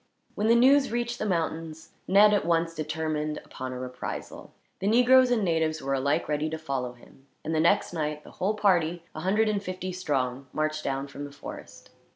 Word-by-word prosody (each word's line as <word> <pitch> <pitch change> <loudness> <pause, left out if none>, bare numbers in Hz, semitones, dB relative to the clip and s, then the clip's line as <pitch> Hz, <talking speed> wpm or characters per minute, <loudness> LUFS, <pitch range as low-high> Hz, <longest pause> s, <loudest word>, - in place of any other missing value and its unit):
When 210 - -1
the 230 - +6
news 270 +3 +5
reached 240 0 -2
the 215 - -1
mountains, 165 -3 -3 0.2
Ned 205 +2 +6
at 205 - +2
once 165 0 +1
determined 155 -1 -2
upon 130 0 -6
a 125 - -5
reprisal. 125 0 -7 0.3
The 195 - -2
negroes 250 +3 +6
and 240 -4 +2
natives 160 -2 +1
were 135 0 -2
alike 135 +2 0
ready 150 +1 -1
to 160 - -4
follow 135 -6 -3
him, 135 +2 -20 0.2
and 160 - -2
the 160 - +1
next 175 +3 +2
night 150 -2 -3
the - - -13
whole 200 +4 -1
party, 175 -5 +2
a - - -6
hundred 205 +6 +2
and 210 -2 0
fifty 185 -1 -5
strong, 135 -7 -2
marched 155 0 -1
down 135 0 -2
from 140 +1 -8
the 145 - -9
forest. 140 - -10
160 Hz, 195 wpm, -27 LUFS, 150-200 Hz, 0.3 s, the